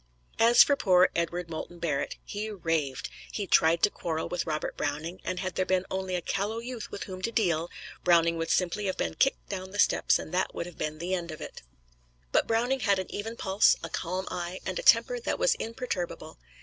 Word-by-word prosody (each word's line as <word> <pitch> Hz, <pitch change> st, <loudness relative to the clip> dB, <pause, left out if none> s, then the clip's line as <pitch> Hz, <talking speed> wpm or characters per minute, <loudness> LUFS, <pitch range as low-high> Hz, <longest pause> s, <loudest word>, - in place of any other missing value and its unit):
As 235 Hz, +1 st, +8 dB
for 285 Hz, -, +2 dB
poor 185 Hz, -7 st, +4 dB
Edward 170 Hz, +1 st, -1 dB
Moulton 165 Hz, +1 st, -6 dB
Barrett 150 Hz, -5 st, -2 dB
he 210 Hz, +1 st, -4 dB
raved. 165 Hz, -8 st, -1 dB, 0.2 s
He 205 Hz, -, -3 dB
tried 165 Hz, -2 st, +4 dB
to 205 Hz, -, +5 dB
quarrel 160 Hz, -2 st, -3 dB
with 180 Hz, -1 st, -3 dB
Robert 155 Hz, -1 st, -2 dB
Browning, 155 Hz, +5 st, -3 dB
and 185 Hz, 0 st, -3 dB
had 185 Hz, -2 st, -3 dB
there 185 Hz, -, +1 dB
been 185 Hz, 0 st, +1 dB
only 190 Hz, -1 st, -2 dB
a 175 Hz, -, -2 dB
callow 205 Hz, +3 st, -1 dB
youth 235 Hz, -1 st, -6 dB
with -, -, -5 dB
whom 185 Hz, -1 st, -7 dB
to 230 Hz, -, -1 dB
deal, 175 Hz, -7 st, +1 dB, 0.3 s
Browning 170 Hz, -1 st, +4 dB
would 165 Hz, 0 st, -2 dB
simply 180 Hz, +4 st, +1 dB
have 190 Hz, -, -2 dB
been -, -, -1 dB
kicked 270 Hz, -, +1 dB
down 185 Hz, -1 st, -4 dB
the 200 Hz, -, -8 dB
steps, -, -, +4 dB
and 155 Hz, -, -8 dB
that 185 Hz, +1 st, 0 dB
would -, -, -3 dB
have 175 Hz, -2 st, -11 dB
been 155 Hz, 0 st, -2 dB
an 155 Hz, -, -9 dB
end 175 Hz, -1 st, -2 dB
of 155 Hz, -, -7 dB
it. -, -, -8 dB, 0.7 s
But -, -, +3 dB
Browning 240 Hz, +4 st, +1 dB
had 200 Hz, -5 st, +2 dB
an 185 Hz, -, -5 dB
even 225 Hz, +3 st, -4 dB
pulse, 195 Hz, +2 st, +4 dB
a -, -, -4 dB
calm 185 Hz, +2 st, -3 dB
eye 175 Hz, +1 st, -4 dB
and -, -, -2 dB
a -, -, -2 dB
temper -, -, +5 dB
that 470 Hz, -, -2 dB
was -, -, +3 dB
imperturbable. 220 Hz, -, -4 dB
185 Hz, 215 wpm, -28 LUFS, 170-205 Hz, 0.7 s, As